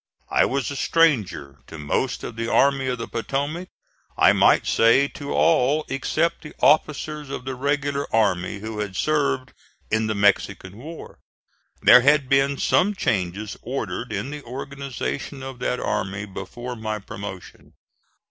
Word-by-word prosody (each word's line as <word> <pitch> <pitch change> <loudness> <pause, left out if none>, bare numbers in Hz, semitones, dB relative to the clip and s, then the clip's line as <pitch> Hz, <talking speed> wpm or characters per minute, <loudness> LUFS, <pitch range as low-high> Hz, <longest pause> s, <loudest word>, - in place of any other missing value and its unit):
I - - +4
was 135 -3 -1
a - - -5
stranger 100 - +1
to 80 - -9
most 75 - -2
of 115 - -6
the 115 0 -3
Army 135 -1 +3
of 125 -1 -1
the 115 - -5
Potomac, 145 +9 -3 0.5
I - - +6
might - - +4
say 115 +5 +4
to 140 - -7
all 155 -1 +3
except 155 +5 0
the 150 - -11
officers 150 0 +2
of 130 -2 -6
the 130 - -3
regular 140 +1 -1
army 100 -2 +1
who 110 0 -5
had 100 -3 -4
served 140 -1 0 0.4
in 110 0 +1
the 110 - -1
Mexican 100 -2 +1
war. 160 +6 -10 0.6
There 125 - +9
had 140 0 +3
been 135 0 +3
some 205 +8 +2
changes 100 - -2
ordered 115 -3 -4
in 140 - -3
the 150 0 -6
organization 135 +1 -5
of 135 -2 -7
that 125 - -1
army 100 +2 -2
before 110 +6 -7
my 110 -1 -3
promotion. 100 -2 -9
130 Hz, 150 wpm, -23 LUFS, 105-140 Hz, 0.6 s, There